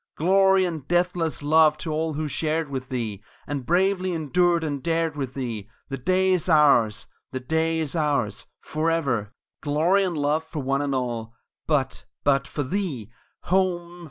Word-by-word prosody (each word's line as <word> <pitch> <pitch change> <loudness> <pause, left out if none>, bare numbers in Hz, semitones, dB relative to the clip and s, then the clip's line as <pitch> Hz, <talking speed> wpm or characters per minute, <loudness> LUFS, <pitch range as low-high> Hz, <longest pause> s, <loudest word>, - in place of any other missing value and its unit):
Glory 190 +2 +4
and 160 -6 -5
deathless 175 -3 0
love 155 0 +5
to 160 - -4
all 160 +1 -1
who 155 +1 -2
shared 155 +1 -1
with 130 -1 -4
thee, 115 -6 -3 0.2
And 140 -4 -4
bravely 185 +1 +2
endured 170 +2 +2
and 145 -3 -3
dared 165 -1 0
with 135 -3 -4
thee 115 -6 -4 0.2
The 135 -1 -4
day 185 +7 +2
is 180 -1 +1
ours 140 -9 +4 0.3
the 130 - -3
day 160 +5 0
is 160 -1 -2
ours 145 -9 0
Forever! 155 -10 -1 0.3
Glory 160 +7 +2
and 180 -4 -2
Love 150 +2 +1
for 155 -3 -6
one 135 +1 0
and 140 -2 -1
all; 115 -3 -3 0.3
but 145 -4 0 0.2
but 140 -1 +2
for 145 - -3
thee 140 - -3 0.3
Home! 175 -2 0
155 Hz, 160 wpm, -24 LUFS, 135-170 Hz, 0.3 s, love